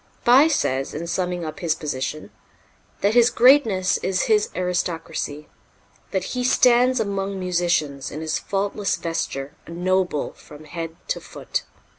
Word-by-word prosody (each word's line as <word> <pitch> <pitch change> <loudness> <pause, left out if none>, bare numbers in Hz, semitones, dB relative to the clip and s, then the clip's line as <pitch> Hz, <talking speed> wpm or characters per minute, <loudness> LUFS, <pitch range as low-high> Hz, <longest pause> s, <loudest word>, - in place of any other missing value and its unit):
Bie 265 +5 +7
says, 135 - 0
in 165 +3 -4
summing 180 0 -2
up 155 -1 -6
his 165 -3 0
position, 145 0 -4 0.7
that 200 +2 +2
his 240 0 +6
greatness 235 -8 +4
is 190 0 0
his 210 -1 +2
aristocracy; 165 -4 -3 0.6
that 190 -2 -1
"he 250 -1 -1
stands 250 0 +4
among 200 -2 -2
musicians, 175 -6 0
in 150 - -6
his 160 0 -2
faultless 200 0 -1
vesture, 145 -4 -3
a - - -11
noble 180 -2 0
from 150 +1 -14
head 165 +1 -6
to - - -1
foot." - - -5
180 Hz, 140 wpm, -23 LUFS, 160-210 Hz, 0.7 s, Bie